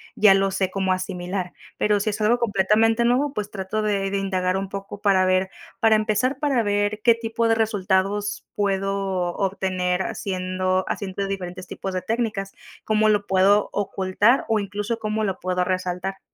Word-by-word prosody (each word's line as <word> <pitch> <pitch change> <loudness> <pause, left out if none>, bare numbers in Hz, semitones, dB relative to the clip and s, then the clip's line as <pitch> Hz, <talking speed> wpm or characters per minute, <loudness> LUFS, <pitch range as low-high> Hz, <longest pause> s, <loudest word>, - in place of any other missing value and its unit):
ya 205 -2 +6
lo 195 0 +2
sé 190 -1 -1
cómo 190 -1 0
asimilar. 185 0 -4 0.2
Pero 210 -1 +2
si 215 - 0
es 210 - -3
algo 235 +3 +3
completamente 225 +2 +2
nuevo, 265 +4 +2
pues, 210 0 -4
trato 200 +2 -3
de 200 -2 0
de 200 - 0
indagar 185 -1 0
un 195 0 -4
poco 200 +1 -7
para 190 -2 +3
ver 185 0 +2 0.3
para 220 -1 +5
empezar, 215 +5 0
para 275 -6 +1
ver 205 +1 0
qué 235 -2 +6
tipo 230 0 -1
de 225 - +4
resultados 205 -1 0
puedo 195 -3 -1
obtener 185 -2 -1
haciendo 185 0 -1
haciendo 195 0 -3
diferentes 185 -2 -5
tipos 190 -1 -5
de 185 - -2
técnicas, 220 -4 -2 0.3
¿cómo 215 0 +2
lo 205 -1 +1
puedo 195 +2 +3
ocultar? 205 +4 +1
O 220 -2 +2
incluso, 205 +3 -3
¿cómo 215 0 -2
lo 190 -1 -3
puedo 180 0 0
resaltar? 185 +1 -2
195 Hz, 170 wpm, -23 LUFS, 185-215 Hz, 0.3 s, ya